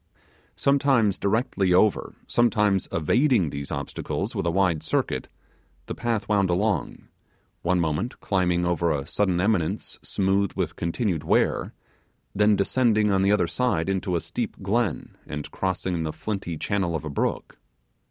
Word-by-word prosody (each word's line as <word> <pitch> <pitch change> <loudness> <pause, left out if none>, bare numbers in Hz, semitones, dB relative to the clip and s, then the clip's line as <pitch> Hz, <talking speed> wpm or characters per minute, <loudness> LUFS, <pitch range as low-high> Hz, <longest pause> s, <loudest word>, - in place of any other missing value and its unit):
Sometimes 135 -7 +2
directly 100 -4 +1
over, 105 +2 +2
sometimes 105 -5 +2
evading 105 - +2
these 70 -1 -5
obstacles 70 -1 -3
with 85 - -2
a - - +3
wide 85 -3 +1
circuit, 65 -4 -1 0.6
the - - -5
path 115 -3 -2
wound 100 -3 +2
along; 100 +4 -1 0.5
one 90 +1 +1
moment 85 +8 -1
climbing 90 -3 +1
over 85 -1 +1
a 70 -3 -1
sudden 95 +2 0
eminence 95 -4 0
smooth 100 0 0
with - - -2
continued 85 -1 -1
wear, 80 - +1 0.6
then 105 +1 +4
descending 110 0 +2
on 95 -1 +2
the 100 +1 +3
other 105 -4 +3
side 100 -4 0
into 95 -1 -1
a 85 - 0
steep - - -4
glen, 110 +3 -1
and 75 -1 -6
crossing 95 -2 -2
the 80 -1 -2
flinty 95 -3 -4
channel 95 -2 -1
of 80 -1 -4
a - - -4
brook. 70 - -2
95 Hz, 145 wpm, -25 LUFS, 85-105 Hz, 0.6 s, then